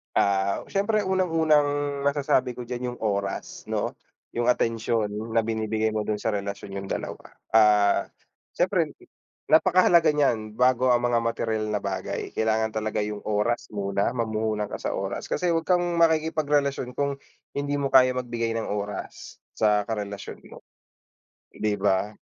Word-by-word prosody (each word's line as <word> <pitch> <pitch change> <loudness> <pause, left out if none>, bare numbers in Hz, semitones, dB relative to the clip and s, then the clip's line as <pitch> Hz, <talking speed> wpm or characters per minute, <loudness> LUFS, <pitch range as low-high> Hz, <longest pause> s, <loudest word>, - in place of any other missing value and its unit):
Ah, 100 0 +2
siyempre 210 +2 +1
unang 190 -1 +1
unang 155 -3 +3 0.4
masasabi 140 -3 +1
ko 125 - -6
diyan 125 0 -4
yung - - -18
oras 100 -2 -3
'no? - - -1 0.4
Yung 120 0 -1
atensyon 115 -3 +1 0.2
na 115 - +4
binibigay 110 0 -1
mo 110 -1 -2
dun 110 - +1
sa 110 +2 -2
relasyon 100 -1 -4
niyong 100 0 -5
dalawa, - - -6 0.2
ah, 105 -2 +4 0.5
syempre - - +1 0.6
napakahalaga 165 -1 +5
niyan 110 -7 0
bago 125 +1 +3
ang 120 -1 +3
mga 120 -1 +2
materyal 115 -2 -1
na 105 -1 -2
bagay, 95 -1 -4
kailangan 110 0 0
talaga 110 -1 -2
yung 105 0 -4
oras 105 +3 0
muna, 100 +3 -1
mamuhunan 110 -2 -1
ka - - -5
sa - - -2
oras - - -4
kasi 180 -1 0
huwag 165 -1 -1
kang 180 -1 +3 0.2
makikipagrelasyon 150 -5 +1
kung 140 0 -1 0.3
hindi 145 0 -2
mo 140 -1 -1
kaya 130 -1 +6
magbigay 120 -2 -2
ng 115 - -3
oras 105 0 -5 0.2
sa 105 -1 +2
karelasyon 100 -2 -5
mo, - - -13 0.9
di 105 -1 -1
ba? 100 +1 0
115 Hz, 150 wpm, -25 LUFS, 105-140 Hz, 0.9 s, kaya